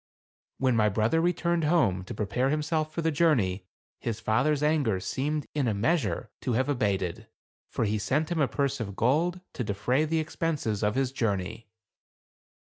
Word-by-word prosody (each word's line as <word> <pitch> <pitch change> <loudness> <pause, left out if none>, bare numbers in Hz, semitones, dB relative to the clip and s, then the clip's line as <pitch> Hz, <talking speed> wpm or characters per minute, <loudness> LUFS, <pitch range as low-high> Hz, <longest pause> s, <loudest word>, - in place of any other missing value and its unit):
When 130 -2 +2
my 105 -1 +4
brother 110 +10 +2
returned 170 -1 +1
home, 150 - +2
to - - -7
prepare 110 +6 0
himself 155 +1 0
for 165 - -3
the 160 - +2
journey, 115 - +2 0.3
his 115 -2 -3
father's 130 +7 +1
anger 145 -10 +2
seemed 145 +10 -2
in 145 -4 0
a 110 - +1
measure, 115 +3 0
to 125 - -1
have 130 +4 +1
abated; 105 -5 -1 0.4
for - - -1
he 105 +1 0
sent 150 +10 0
him 165 -3 +1
a 140 - +4
purse 140 -1 -1
of 100 -4 -4
gold, 165 - +1
to 125 - -3
defray 110 +8 +1
the 160 +1 0
expenses 155 -9 -1
of 105 +2 +1
his 135 -1 +1
journey. 110 -2 -2
130 Hz, 170 wpm, -28 LUFS, 105-155 Hz, 0.4 s, my